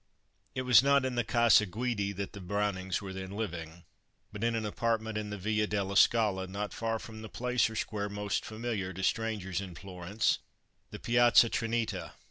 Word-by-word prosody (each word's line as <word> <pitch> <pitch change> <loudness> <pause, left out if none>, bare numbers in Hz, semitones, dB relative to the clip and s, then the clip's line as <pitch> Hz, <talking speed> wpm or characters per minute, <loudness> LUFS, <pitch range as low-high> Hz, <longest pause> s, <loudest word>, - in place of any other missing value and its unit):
It 130 - -1
was 125 -2 +7
not 140 0 +3
in 130 - -1
the 120 -1 +1
Casa 115 -2 +4
Guidi 105 0 -2
that 100 0 -5
the 100 - -8
Brownings 95 -1 -1
were 95 -1 -6
then 95 0 -6
living, 85 -5 -5 0.5
but 105 +1 -6
in 115 0 +1
an 110 -1 -2
apartment 110 0 -1
in 105 -1 -3
the 105 - -5
Via 105 +2 0
della 100 -1 -2
Scala, 100 -3 +4
not 100 +2 -4
far 115 0 -1
from 110 0 -9
the 110 - -8
place 125 -1 +1
or 110 - -8
square 105 -2 -2
most 105 -1 -2
familiar 110 -4 -4
to 95 +2 -6
strangers 105 -4 -1
in 95 -3 -8
Florence 95 +3 -1 0.5
the - - -7
Piazza 120 -1 +5
Trinita. 115 -1 -2
105 Hz, 185 wpm, -31 LUFS, 95-115 Hz, 0.5 s, was